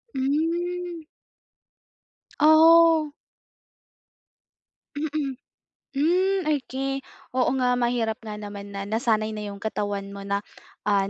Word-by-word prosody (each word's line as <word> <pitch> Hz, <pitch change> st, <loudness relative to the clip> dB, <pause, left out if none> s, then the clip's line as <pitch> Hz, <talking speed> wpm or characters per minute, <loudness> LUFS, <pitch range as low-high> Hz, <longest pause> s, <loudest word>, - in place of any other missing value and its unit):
Hmm. 335 Hz, +5 st, -1 dB, 1.4 s
Oh. 320 Hz, 0 st, +6 dB, 1.9 s
Mm. 295 Hz, -2 st, -2 dB, 0.6 s
Hmm, 360 Hz, +6 st, +1 dB
okey, 270 Hz, -2 st, -1 dB, 0.3 s
oo 255 Hz, -1 st, +2 dB
nga 250 Hz, -1 st, +2 dB
mahirap 240 Hz, -2 st, 0 dB
nga 215 Hz, -2 st, -7 dB
naman 205 Hz, -1 st, -8 dB
na 200 Hz, 0 st, -5 dB
nasanay 220 Hz, 0 st, 0 dB
na 210 Hz, -, -5 dB
yung 200 Hz, -, -8 dB
katawan 205 Hz, -1 st, -3 dB
mo 200 Hz, -, -8 dB
na, 200 Hz, +1 st, -2 dB, 0.4 s
ah, 200 Hz, -1 st, +2 dB
260 Hz, 95 wpm, -25 LUFS, 210-315 Hz, 1.9 s, Oh